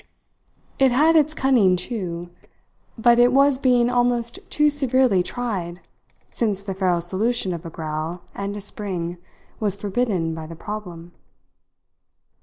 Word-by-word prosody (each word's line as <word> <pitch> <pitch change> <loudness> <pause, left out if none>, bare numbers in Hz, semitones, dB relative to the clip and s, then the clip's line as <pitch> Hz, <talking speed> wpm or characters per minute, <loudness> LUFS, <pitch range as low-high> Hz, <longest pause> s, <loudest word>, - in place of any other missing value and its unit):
It 265 -1 +4
had 310 +6 +4
its 310 0 +3
cunning 240 -11 +3
too, 175 -3 -5 0.7
but 235 +1 +4
it 245 +1 +5
was 275 0 +4
being 245 -3 +3
almost 245 -1 0
too 300 0 +2
severely 260 -8 +4
tried 180 -5 -4 0.5
since 205 -4 -2
the 195 -1 -4
feral 185 -2 0
solution 190 +3 +1
of 170 0 -7
a - - -6
growl 160 +2 -5
and 200 +1 -5
a - - -7
spring 180 -4 -4 0.4
was 205 -3 0
forbidden 200 -5 -1
by 160 -1 -7
the 165 - -9
problem. 175 -3 -8
205 Hz, 135 wpm, -22 LUFS, 175-245 Hz, 0.7 s, it